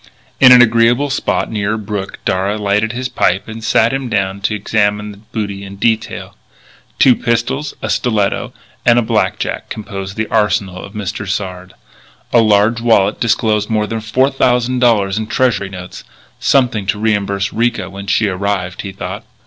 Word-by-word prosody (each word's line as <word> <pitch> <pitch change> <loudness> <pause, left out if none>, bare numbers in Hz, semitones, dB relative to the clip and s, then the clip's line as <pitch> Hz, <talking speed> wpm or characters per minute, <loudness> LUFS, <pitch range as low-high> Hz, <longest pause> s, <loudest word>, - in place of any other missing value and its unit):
In 130 -1 +8
an 125 -1 +9
agreeable 120 +4 +2
spot 105 -8 -1
near 105 -1 -1
a - - -1
brook 105 -2 -5
Darragh 95 +3 0
lighted 105 +2 +1
his 125 +1 -3
pipe 95 -5 0
and 110 0 -8
sat 115 +2 +2
him 135 -2 -3
down 95 -2 -1
to 105 +2 0
examine 105 0 0
the 100 - -13
booty 100 -2 -5
in 100 0 -9
detail. 110 +2 -2 0.6
Two 130 -2 +6
pistols, 120 +5 -1
a - - -2
stiletto, 110 -5 0 0.3
and 120 -1 +4
a 120 - +3
blackjack - - -1
composed 100 -2 -6
the 110 - 0
arsenal 105 -4 0
of 100 - -10
Mr. 100 -1 -5
Sard. 95 -2 -4 0.6
A 120 - +6
large 110 +2 +3
wallet 110 -4 +3
disclosed 110 -2 +1
more 110 -1 +1
than 110 +1 -4
four 130 +6 +1
thousand 125 -1 +1
dollars 105 -5 +2
in 110 - -4
Treasury 120 -7 0
notes 90 -2 -9 0.4
something 120 -7 +1
to 100 - 0
reimburse 100 -2 -1
Ricca 115 -4 0
when 100 +1 -9
she 110 - +2
arrived, 95 -1 -2
he 100 - -6
thought. 95 - -6
105 Hz, 170 wpm, -16 LUFS, 100-115 Hz, 0.6 s, an